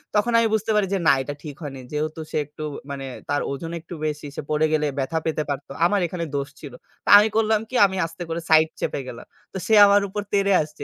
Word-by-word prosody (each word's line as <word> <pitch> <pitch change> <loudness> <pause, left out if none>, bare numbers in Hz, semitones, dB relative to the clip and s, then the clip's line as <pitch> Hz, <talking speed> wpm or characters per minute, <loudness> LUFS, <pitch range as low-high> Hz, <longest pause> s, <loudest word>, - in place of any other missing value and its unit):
তখন 210 +3 +2
আমি 230 0 +4
বুঝতে 220 0 0
পারি 210 -2 +2
যে 195 - +1
না - - +7
এটা 145 +2 -5
ঠিক 150 -3 -7
হয়নি। 135 -2 -6
যেহেতু 155 +2 -3
সে - - -1
একটু 150 +2 -10 0.3
মানে 135 -1 -5 0.2
তার 145 0 +1
ওজন 165 +4 -5
একটু 165 +2 -11
বেশি, 150 -1 -3
সে - - -4
পড়ে 155 +1 +2
গেলে 155 -1 +2
ব্যথা 140 +4 -1
পেতে 155 -1 -1
পারত 140 0 -3 0.2
আমার 205 +2 +2
এখানে 170 0 -4
দোষ 140 0 -2
ছিল। 145 -4 -10 0.3
তা - - -2
আমি 210 - +4
করলাম 220 -1 +3
কি 255 - -7
আমি 190 -1 -2
আস্তে 165 +2 -7
করে 165 +1 -3
সাইড 160 0 +5
চেপে - - -2
গেলাম। 115 - -9 0.3
তো - - -4
সে 220 - +2
আমার 200 0 +5
উপর 205 +2 -4
তেড়ে 200 -1 +3
আসছে। 150 0 -7
160 Hz, 240 wpm, -23 LUFS, 150-200 Hz, 0.3 s, না